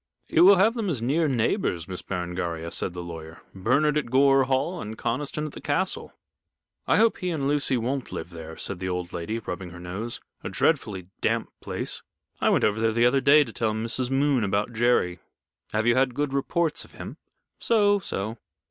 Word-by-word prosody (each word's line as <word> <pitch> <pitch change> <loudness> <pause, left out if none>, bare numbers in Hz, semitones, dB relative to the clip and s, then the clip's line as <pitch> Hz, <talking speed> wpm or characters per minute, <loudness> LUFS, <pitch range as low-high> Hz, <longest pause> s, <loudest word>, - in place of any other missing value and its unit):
"You 165 - +4
will 200 +1 +9
have 205 +5 +4
them 225 -5 -2
as 145 -8 -1
near 145 +8 +1
neighbors, 115 - 0
Miss 95 -1 -6
Berengaria," 85 -2 -4
said 90 - 0
the 90 0 -6
lawyer. 80 -1 -9
"Bernard 140 +10 +2
at 135 - -6
Gore 135 +1 +5
Hall 135 +7 0
and 110 +1 -6
Conniston 145 +5 -2
at 155 - -5
the - - -10
castle." 185 +6 -1 0.8
"I - - +4
hope 225 +1 +4
he 180 - -2
and 150 -5 -1
Lucy 145 -2 +1
won't 130 +3 -2
live 85 - -6
there," 80 -1 -9
said 100 - -3
the 95 0 -3
old 90 -1 -3
lady, 85 +7 -3
rubbing 90 -5 -5
her 85 +1 -11
nose. 95 +7 -5 0.2
"A - - -3
dreadfully 105 - 0
damp - - 0
place. - - -4 0.4
I - - +4
went - - +3
over 105 +1 +2
there 110 0 +2
the 120 +1 +3
other 135 +2 +3
day 145 +2 +6
to 115 -5 -10
tell 110 -2 0
Mrs. 115 +3 -2
Moon 135 -2 +2
about 100 +3 0
Jerry." 110 -7 +2 0.5
"Have 110 +1 0
you 120 - +5
had 130 -1 +2
good 145 -1 -1
reports 155 +4 0
of - - -17
him?" - - -8 0.4
"So, 205 -3 +3
so. 110 - -4
120 Hz, 200 wpm, -26 LUFS, 95-145 Hz, 0.8 s, will